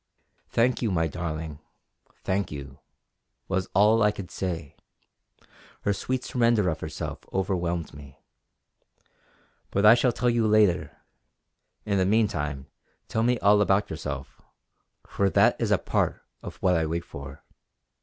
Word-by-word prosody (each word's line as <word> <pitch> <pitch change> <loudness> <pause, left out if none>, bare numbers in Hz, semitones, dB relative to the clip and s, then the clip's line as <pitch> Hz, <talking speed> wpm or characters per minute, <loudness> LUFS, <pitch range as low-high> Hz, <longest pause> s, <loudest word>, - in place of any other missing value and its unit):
"Thank 125 +2 +1
you, 115 - +1
my 80 -4 +1
darling, 80 -2 -5 0.6
thank 95 +1 -1
you!" 70 -2 -8 0.7
was 95 0 -1
all 105 +3 +5
I 105 - +5
could 100 -3 -7
say; 85 -6 -4 1.1
her 100 - +1
sweet 130 +5 -3
surrender 115 -6 +2
of 80 - -3
herself - - -5
overwhelmed 90 -4 -2
me. 70 -1 -13 1.5
"But 100 +1 +1
I 105 - +10
shall 120 +1 +3
tell 120 +1 +1
you 115 -2 +2
later; 95 -8 +2 0.9
in 100 -2 +1
the 95 - +3
meantime 80 -11 0 0.4
tell 110 - 0
me 120 +2 +2
all 105 +1 +5
about 100 0 +2
yourself, 70 -4 -6 0.6
for 100 -1 0
that - - +4
is - - +1
a - - +4
part - - -1 0.2
of - - -8
what 90 -2 +4
I 80 -1 +1
wait 85 +2 -3
for." 70 -1 -10
95 Hz, 140 wpm, -26 LUFS, 80-105 Hz, 1.5 s, I